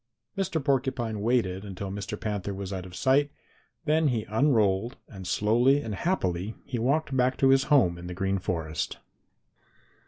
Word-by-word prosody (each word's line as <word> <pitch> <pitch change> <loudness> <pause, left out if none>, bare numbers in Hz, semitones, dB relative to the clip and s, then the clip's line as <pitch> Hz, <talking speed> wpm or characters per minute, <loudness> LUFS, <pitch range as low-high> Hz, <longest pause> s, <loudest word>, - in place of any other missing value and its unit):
Mr. 190 -4 -1
Porcupine 130 -6 0
waited 105 -5 +1
until 100 -1 -6
Mr. 100 +2 -5
Panther 100 -3 -3
was 95 0 -5
out 95 -1 -5
of 90 - -11
sight, 135 +8 +3 0.6
then 155 0 +3
he 120 -5 0
unrolled, 110 -3 +2
and 95 -6 -9
slowly 120 +9 +3
and 110 - -4
happily 100 - -1
he 125 - -3
walked 140 +4 +1
back 130 0 +2
to 135 - +4
his 135 0 +4
home 90 - +3
in 90 - -8
the 90 - -6
Green 95 +1 0
Forest. 80 -5 -3
110 Hz, 160 wpm, -27 LUFS, 95-135 Hz, 0.6 s, to